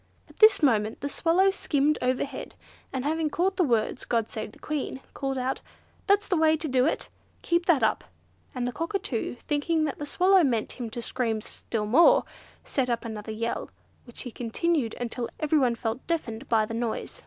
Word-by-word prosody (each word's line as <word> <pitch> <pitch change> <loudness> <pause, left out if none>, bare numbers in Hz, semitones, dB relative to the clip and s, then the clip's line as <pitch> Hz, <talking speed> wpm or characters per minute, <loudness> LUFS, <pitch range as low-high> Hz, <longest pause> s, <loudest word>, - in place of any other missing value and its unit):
At - - -20
this 430 -5 +7
moment 220 -5 +2
the 285 - -2
Swallow 350 +6 +3
skimmed 300 -5 +1
overhead, 255 +2 -2 0.4
and 260 0 -3
having 315 +1 0
caught 370 +6 0
the 365 - +4
words 235 -7 0
"God 230 -2 -1
save 215 -1 -5
the - - -17
Queen," 295 -3 -4
called 270 -1 -2
out, 260 +1 -2 0.5
"That's 405 0 +3
the 375 - +1
way 315 0 +4
to 310 - -3
do 255 0 +3
it! - - -1 0.4
keep 340 0 +1
that 330 -7 +4
up" - - +1 0.5
and 250 -1 -1
the 245 - -1
Cockatoo, 330 - -3
thinking 310 +2 +1
that 290 - -4
the 295 - -4
Swallow 375 +3 +4
meant 235 -6 0
him 235 -2 -3
to 235 +2 -5
scream 230 -3 -1
still 215 0 -4
more, 340 - +6 0.4
set 260 -3 -1
up 235 0 -1
another 220 -1 -5
yell, 230 +2 -3 0.4
which 240 - -9
he 245 - -6
continued 245 +2 -1
until 240 0 -3
everyone 285 -6 +2
felt 230 +2 -4
deafened 270 -7 -3
by 220 -2 +3
the 225 - -7
noise. 230 -1 -3
265 Hz, 190 wpm, -27 LUFS, 230-320 Hz, 0.5 s, this